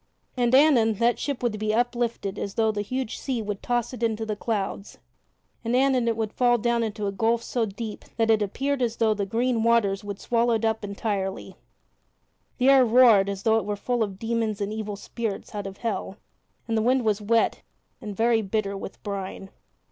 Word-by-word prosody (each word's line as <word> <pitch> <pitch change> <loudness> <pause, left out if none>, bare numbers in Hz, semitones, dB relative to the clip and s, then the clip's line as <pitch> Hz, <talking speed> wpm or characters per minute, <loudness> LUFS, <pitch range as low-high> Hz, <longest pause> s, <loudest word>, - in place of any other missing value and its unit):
And 245 0 +2
anon 255 -7 +5
that 235 +3 +1
ship 280 -4 -3
would 220 -3 -1
be 215 0 0
uplifted 235 -4 -1
as 200 - -4
though 220 -1 +2
the 205 -1 -3
huge 255 +2 -4
sea 260 -4 -2
would 205 -2 -4
toss 240 0 -1
it 250 - -8
into 225 -1 0
the 215 -1 -2
clouds; 205 -2 -3 0.7
and 230 +1 0
anon 260 -2 +3
it 230 -1 +1
would 220 -2 -2
fall 245 -1 +3
down 235 +1 +1
into 215 -2 -3
a 200 - -1
gulf 230 +3 +1
so 235 -3 -1
deep 210 +1 -7
that 225 -1 +3
it 220 -1 +3
appeared 270 +7 -1
as 235 -2 0
though 220 -2 +2
the 200 -2 -3
green 235 +2 0
waters 220 -4 +2
would 200 -1 -6
swallow 235 0 +1
it 225 0 -1
up 220 -1 0
entirely. 200 -1 -3 1.0
The 255 +1 +4
air 270 -1 +7
roared 230 -5 +6
as 195 -1 -5
though 220 0 +4
it - - -6
were 205 0 -2
full 245 +3 -2
of 200 -3 -2
demons 225 -1 -1
and 205 +1 -2
evil 215 -1 -4
spirits 220 +1 -5
out 205 -1 -4
of 195 0 -9
hell, 210 -3 -3 0.5
and 225 - -1
the 220 - +2
wind 250 +1 +2
was 210 -1 +1
wet 225 +2 +1 0.4
and 210 -4 -7
very 230 0 +3
bitter 200 -1 -2
with 195 - -8
brine. 195 -1 -5
225 Hz, 205 wpm, -25 LUFS, 205-235 Hz, 1.0 s, air